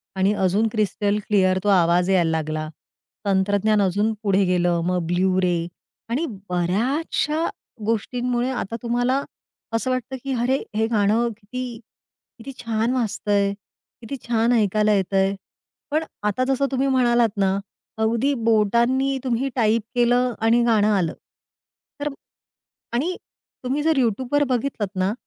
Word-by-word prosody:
आणि 190 +2 +2
अजून 200 +5 +2
crystal 210 -1 0
clear 185 -3 +3
तो 205 - +1
आवाज 175 -1 +3
यायला 180 -4 +3
लागला. 155 -1 -2 0.6
तंत्रज्ञान 205 +2 +2
अजून 205 +3 +1
पुढे 200 -1 +3
गेलं. 175 -1 +1
मग 180 -1 0
ब्लू 185 +2 +1
रे 180 -2 +2 0.5
आणि 270 +8 0 0.2
बऱ्याचशा 260 - 0 0.4
गोष्टींमुळे 245 +3 -1
आता 235 -4 -3
तुम्हाला 245 +3 +1 0.5
असं 230 +3 0
वाटतं 255 +1 -3
की 275 -1 -2
अरे 260 +3 +2 0.2
हे 220 +1 +2
गाणं 220 +1 +2
किती, 240 +2 -6 0.6
किती 255 +3 -8
छान 230 0 0
वाजतंय 205 -4 0 0.5
किती 240 +4 -6
छान 230 0 +2
ऐकायला 215 -1 +3
येतंय. 195 0 +1 0.6
पण 310 +2 +1 0.2
आता 210 +5 0
जसं 270 +1 +1
तुम्ही 270 +1 +1
म्हणालात 240 -3 +3
ना 195 0 +2 0.4
अगदी 230 +6 +2
बोटांनी 235 +5 +2
तुम्ही 255 +1 0
टाईप 225 -2 +2
केलं 245 +1 +3
आणि 235 +2 +4
गाणं 220 -3 +3
आलं 175 -5 0 0.9
तर 290 - -2 0.9
आणि 315 +10 0 0.5
तुम्ही 270 +4 -1
जर 320 -1 +2
YouTubeवर 255 +4 +1
बघितलात 245 -4 -1
ना 185 +2 +1
225 Hz, 130 wpm, -23 LUFS, 195-250 Hz, 0.9 s, आणि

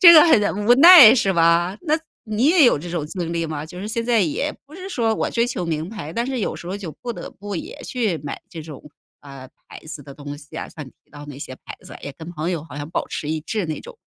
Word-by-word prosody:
这 350 -4 +11
个 310 -2 +10
很 210 - +2
无 240 - +7
奈 300 -6 +10
是 215 -6 +1
吧？ 170 +2 +3
那 315 -1 +1 0.3
你 215 +4 0
也 325 0 +6
有 240 - +4
这 170 +4 -8
种 165 -4 -3
经 170 +1 -5
历 165 0 -1
吗？ 155 -1 -5
就 175 +3 -11
是 205 - -5
现 230 +1 -2
在 235 -2 +3
也 195 - -1 0.2
不 300 - -15
是 375 +1 -8
说 230 - 0
我 - - -1
追 235 0 +1
求 185 -7 -4
名 160 0 -3
牌， 185 -9 -7
但 235 +4 -2
是 265 -1 -3
有 - - -2
时 - - -10
候 185 - -4
就 195 -5 -7
不 240 -1 -3
得 - - -8
不 205 0 -8
也 - - -7
去 225 -9 -1
买 145 -1 -7
这 160 -2 -8
种， 150 -4 -10 0.4
呃， 135 -2 -11 0.2
牌 - - -10
子 155 -2 -8
的 140 0 -12
东 145 0 -8
西 150 +1 -13
啊， - - -4
像 155 -6 -9
你 - - -13
提 - - -38
到 145 0 -11
那 145 -2 -9
些 130 - -7
牌 - - -9
子， - - -12
也 140 - -5
跟 165 +1 -9
朋 160 +1 -3
友 165 -4 -3
好 160 - -11
像 145 0 -6
保 170 - -3
持 150 - -5
一 155 0 -2
致 210 +2 -3
那 155 - -4
种， 485 -2 -13
175 Hz, 295 characters per minute, -21 LUFS, 155-235 Hz, 0.4 s, 这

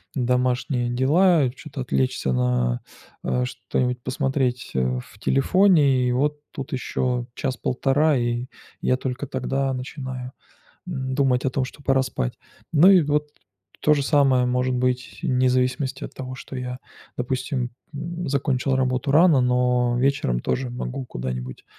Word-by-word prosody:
домашние 125 0 0
дела, 150 +5 +4
и - - +1
чё-то 135 +1 -8
отвлечься 65 - 0
на, 60 -1 +1 0.4
э, 125 0 0
что-нибудь 125 0 -2
посмотреть, 130 -1 -1
э, 65 -1 +1
в - - -17
телефоне, 145 -4 +4
и 125 - +1
вот 145 +4 0
тут 135 -4 -6
еще 125 -1 -1
час-1.5, 135 +3 +1
и 120 +1 -1 0.3
я 130 - +2
только 130 +2 -4
тогда 135 0 -1
начинаю, 130 -1 -6 0.6
н 130 -6 -3
думать 130 -3 +2
о 135 - +2
том, 130 0 0
что 140 +2 -10
пора 135 -1 +3
спать. - - -3 0.3
Ну 165 +4 +7
и 185 -4 +7
вот 150 0 0 0.5
то 150 - +4
же 145 - 0
самое 135 -3 +3
может 125 +1 +1
быть 125 0 -1
вне 130 0 +2
зависимости 130 +1 0
от - - -6
того, 130 0 -6
что 135 - -8
я, 125 0 -4 0.4
допустим, 125 0 -2 0.2
м, 170 +3 -4
закончил 135 -1 0
работу 130 +1 0
рано, 160 -3 +6
но 125 -1 +2
вечером 125 - +1
тоже 130 0 -1
могу 125 +2 -5
куда-нибудь 65 - -5
130 Hz, 145 wpm, -23 LUFS, 125-140 Hz, 0.6 s, Ну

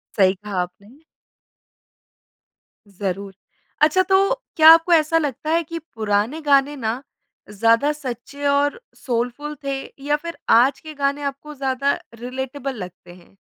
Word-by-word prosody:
सही 190 -2 +4
कहा 195 -2 -3
आपने। 200 +8 -9 1.9
ज़रूर। 195 0 -5 0.5
अच्छा 310 +5 +5
तो 390 +4 +3 0.2
क्या 315 0 +8
आपको 330 +1 +3
ऐसा 320 0 +4
लगता 300 0 -2
है 335 +1 +2
कि 330 +2 -6
पुराने 225 0 -2
गाने 285 0 +3
ना 235 -1 -3 0.5
ज़्यादा 230 +7 +3
सच्चे 280 0 -7
और 285 +7 +2 0.2
सोलफ़ुल 250 +5 -3
थे 275 -1 -2 0.3
या 295 0 +2
फिर 335 - -5 0.2
आज 270 +2 +2
के 310 -1 -10
गाने 280 0 -1
आपको 280 +2 -5
ज़्यादा 270 +1 0 0.2
रिलेटेबल 265 +2 -5
लगते 180 -1 -12
हैं? 180 +2 -21
275 Hz, 135 wpm, -21 LUFS, 225-300 Hz, 1.9 s, क्या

